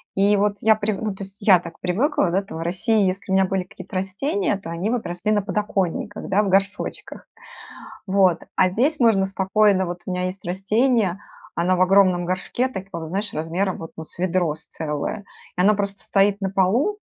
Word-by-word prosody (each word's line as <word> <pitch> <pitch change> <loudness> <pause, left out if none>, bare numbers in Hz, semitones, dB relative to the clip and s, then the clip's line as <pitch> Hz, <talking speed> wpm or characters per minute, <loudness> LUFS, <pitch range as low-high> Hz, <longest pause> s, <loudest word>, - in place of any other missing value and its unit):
И 200 +1 +4
вот 205 0 +1
я 220 0 +5
прив 210 -1 -2
ну 215 -2 -2
то 195 +1 -7
есть 195 +1 -9
я 195 -3 +6
так 170 -1 -11
привыкла, 185 - +1
да, 190 - +2
там 195 -4 -9
в 165 - -5
России, 190 +5 +1
если 190 +1 -2
у - - +3
меня 190 - +4
были 190 0 -1
какие-то 185 0 -12
растения, 275 - -1
то 180 -4 -8
они 170 +5 -2
вот 240 -1 -1
росли 175 +4 -2
на 205 -2 +2
подоконниках, 205 -1 -2
да, 195 +2 +3
в 200 - -1
горшочках. 195 +1 -1 0.8
Вот. 190 -3 +3 0.2
А 185 -1 +4
здесь 270 - +1
можно 220 -5 +4
спокойно 195 0 +2
Вот 175 0 -6
у 185 - -4
меня 180 0 -2
есть 185 +1 -5
растение, 200 +2 +1 0.3
оно 180 +2 +1
в 185 - 0
огромном 185 -2 +4
горшке, 185 +8 -1
такого 190 -7 -6
знаешь, 200 +4 -3
размером 170 +5 -2
вот 165 - -8
ну 160 - -7
с - - -12
ведро 175 -4 0
с 160 - -6
целое, 160 +7 -4 0.3
и 180 - +2
оно 210 +3 +5
просто 200 -1 -3
стоит 200 -1 +2
на 195 - 0
полу, 230 - +1
195 Hz, 205 wpm, -22 LUFS, 180-210 Hz, 0.8 s, я